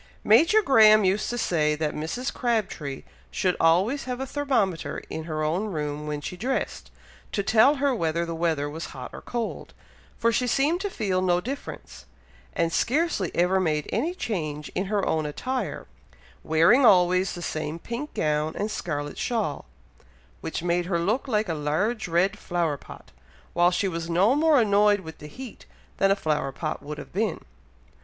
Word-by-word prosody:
Major 420 +7 +5
Graham 215 - +6
used 195 +2 +1
to 240 - -3
say 155 -8 +1
that 150 0 -2
Mrs. 200 - -3
Crabtree 210 - -2 0.3
should 185 -2 0
always 190 - +3
have 250 -1 -4
a 265 - -2
thermometer 250 - -1
in 160 - -5
her 155 -2 -3
own 170 +7 0
room 150 -5 -4
when 150 -1 -3
she 180 - -5
dressed, 250 +8 -3 0.4
to 200 - 0
tell 225 +8 +5
her 280 -1 +1
whether 170 -5 -1
the 170 - -4
weather 160 -3 0
was 160 +3 -6
hot 125 - -7
or - - -8
cold, 235 -2 -5 0.4
for 230 - +2
she 250 +2 0
seemed 295 +8 +1
to 405 - -2
feel 190 - -1
no 175 -1 +2
difference, 265 +9 -7 0.5
and 165 -1 0
scarcely 270 - +1
ever 180 +2 +3
made 155 -5 0
any 310 - 0
change 155 - -4
in 185 - -1
her 200 0 0
own 155 -1 0
attire, 255 - -3 0.6
wearing 165 - +4
always 185 -3 +4
the 175 - -7
same 155 0 -3
pink 235 - -6
gown 150 0 0
and 210 +1 -2
scarlet 145 -6 -4
shawl, 215 - -2 0.7
which 160 - -4
made 175 0 0
her 175 -2 0
look 210 +11 0
like 215 -4 0
a 165 - -1
large 160 +10 -1
red 175 +3 +1
flower 170 -4 -1
pot, 140 - -13 0.4
while 175 +1 +4
she 180 +2 0
was 165 -2 -4
no 190 +8 +4
more 305 0 +4
annoyed 205 -2 +4
with 160 -3 -10
the 150 - -9
heat 255 - -10 0.3
than 195 - +3
a 195 - +4
flower 150 -7 -1
pot 155 +3 -4
would 150 +1 -7
have - - -10
been. 205 -1 -1
185 Hz, 175 wpm, -25 LUFS, 160-230 Hz, 0.7 s, Graham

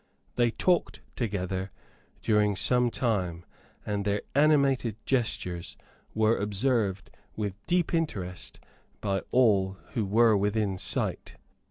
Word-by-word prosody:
They 120 -1 +3
talked 175 +9 0
together 95 -4 -2 0.5
during 105 -2 +3
some 125 +4 +3
time; 95 -9 -1 0.4
and 105 -1 -2
their 100 0 -1
animated 140 -6 +3
gestures 105 -9 -1 0.4
were 110 +1 +3
observed 105 -2 0 0.2
with 105 -1 -4
deep 175 -1 +1
interest 95 - -3 0.4
by 95 -1 -1
all 100 -6 +3
who 110 -4 -1
were 110 +2 +5
within 100 -1 0
sight. - - -3
105 Hz, 110 wpm, -28 LUFS, 95-120 Hz, 0.5 s, were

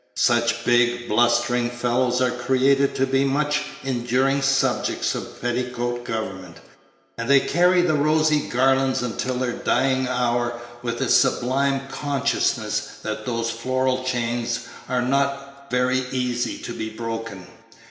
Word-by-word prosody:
Such 120 0 +2
big, 120 0 +2
blustering 120 +2 +2
fellows 125 +1 0
are 125 -1 +2
created 135 +3 +2
to 135 - +2
be 135 0 +1
the 140 - +1
much 150 +2 +1 0.2
enduring 130 +2 +1
subjects 135 0 +1
of - - -7
petticoat 120 0 -2
government; 95 -6 -5 0.6
and 115 +2 -3
they 140 0 +7
carry 180 +4 +3
the 175 -3 +2
rosy 155 0 +2
garlands 130 0 +2
until 125 +1 -2
their 125 0 -1
dying 130 +1 +1
hour 120 -1 0 0.2
with 120 -1 -3
a - - +1
sublime 135 +1 +2
consciousness 145 -2 -1
that 110 +1 -5
those 115 -1 -1
floral 130 +2 -1
chains 120 -1 -1 0.3
are 125 -1 0
not 140 +1 -2
very 125 +1 +1
easy 125 -2 -1
to 120 - -5
be 110 -1 -4
broken. 115 -4 -6
125 Hz, 135 wpm, -23 LUFS, 120-135 Hz, 0.6 s, they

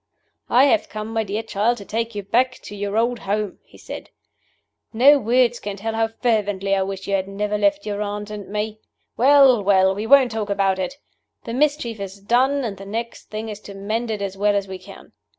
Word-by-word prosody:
"I 250 +2 +5
have 300 +3 +2
come, 215 0 -5
my 225 -1 +1
dear 210 +2 -3
child, 225 +2 0
to 200 - -10
take 230 +1 -3
you 205 - -4
back 250 +6 +2
to 205 - -9
your 205 +1 -3
old 235 +1 +1
home," 205 0 -2
he - - -19
said. - - -9 0.8
"No 275 +6 +6
words 240 0 +2
can 205 -1 -5
tell 220 +3 -3
how 225 0 +1
fervently 205 -4 0
I 195 - +1
wish 195 0 -4
you 200 - -2
had 190 -1 0
never 205 +1 -2
left 300 +7 +1
your 205 -1 -3
aunt 210 0 -4
and 205 -2 -7
me. 210 +1 -3 0.4
Well! 265 -3 +6
well! 190 -1 +4
we 210 +3 -4
won't 265 -2 +6
talk 215 -2 -3
about 195 -1 +1
it. 190 +10 -3 0.5
The 230 - -6
mischief 270 -5 0
is 195 0 -7
done, 260 +7 +2
and 200 -4 -4
the 195 - -10
next 230 +3 -5
thing 215 +1 -5
is 210 -1 -6
to 200 -1 -11
mend 220 +4 -3
it 210 -2 -2
as 195 -1 -4
well 205 +1 +2
as 200 -1 -1
we 190 -1 -7
can. 195 +2 -14
215 Hz, 220 wpm, -22 LUFS, 200-235 Hz, 0.8 s, No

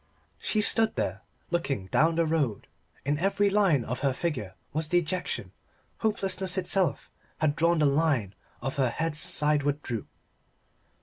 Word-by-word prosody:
She 215 - +1
stood 220 +1 +4
there - - -2 0.3
looking 140 - -1
down 160 +2 +3
the 165 0 +2
road; 150 -10 0 0.4
in 145 +1 0
every 200 +2 +2
line 190 - +3
of 125 - -3
her 135 -1 +1
figure 125 - -3 0.2
was 155 +1 -1
dejection; 175 +2 -1 0.5
hopelessness 195 -4 -1
itself 185 -5 +1 0.3
had 155 -2 +1
drawn 170 +1 +3
the 155 - +3
line 140 - +2 0.3
of 135 +2 -3
her 130 -3 +2
head's 155 +3 -1
sideward 150 -4 +1
droop. 115 -4 -4
155 Hz, 140 wpm, -28 LUFS, 140-180 Hz, 0.5 s, stood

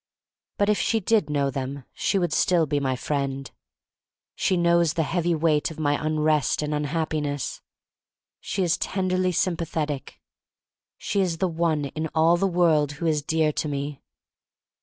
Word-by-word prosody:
But 205 - +2
if 210 0 +2
she 225 - +1
did 220 -2 +1
know 140 -2 0
them 135 +1 -4
she - - 0
would 175 -4 0
still 175 -3 +3
be 145 -1 0
my 130 -2 0
friend. 135 0 -3 0.8
She 185 - +1
knows 170 -2 +3
the 165 - +2
heavy 170 +2 0
weight 155 -2 +2
of 160 - -10
my 145 -1 +2
un 155 0 0
rest 150 -1 +2
and 150 0 -2
unhappiness. 150 -2 -2 0.8
She 190 - -2
is 170 -2 +1
tenderly 185 -1 0
sympathetic. 165 -5 -2 0.8
She 200 - -1
is 175 -3 0
the 185 - +1
one 165 -3 0
in 155 +3 -4
all 165 +2 +5
the 195 +3 +1
world 160 -5 +2
who 160 +3 -5
is 155 -2 +2
dear 155 0 +1
to 150 - -2
me. 145 0 -4
160 Hz, 160 wpm, -25 LUFS, 145-175 Hz, 0.8 s, all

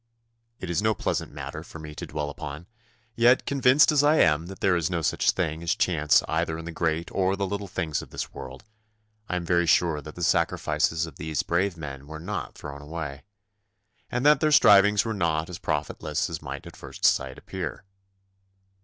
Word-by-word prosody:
It 95 - -5
is 85 - +1
no 110 0 +2
pleasant - - -2
matter - - -7
for - - -11
me 75 -1 -9
to - - -7
dwell 75 -1 -3
upon, 75 +3 -7 0.5
yet, 120 +2 +4
convinced 140 +2 +4
as 150 -2 +4
I 150 +2 +5
am 80 - +3
that 95 0 -9
there 95 -2 +3
is 85 -2 0
no 85 -3 -2
such - - +1
thing 80 -2 0
as 85 0 0
chance 75 -4 +3
either 80 0 -1
in 80 - -8
the 85 - -5
great 80 0 -1
or 95 0 +1
the 100 0 -1
little 100 +1 -4
things 80 -5 -2
of - - -12
this - - -6
world, 65 +1 -9 0.7
I 90 - -1
am 90 -1 -2
very 85 0 +2
sure 80 -2 +3
that 75 +2 -10
the 90 - -5
sacrifices 80 0 +1
of 80 - -12
these 80 -3 -2
brave 90 +1 0
men 70 -3 -8
were 80 +1 -8
not 95 +6 -5
thrown 70 -1 -8
away, 75 -2 -6 0.8
and 125 +2 -2
that 150 -1 +6
their 155 0 +2
strivings 105 -6 +6
were 115 - -1
not 80 -3 -1
as 85 - -7
profitless 75 -1 -2
as - - -5
might - - -7
at - - -11
first - - -6
sight 65 -1 +2
appear. - - -6
85 Hz, 200 wpm, -26 LUFS, 75-100 Hz, 0.8 s, that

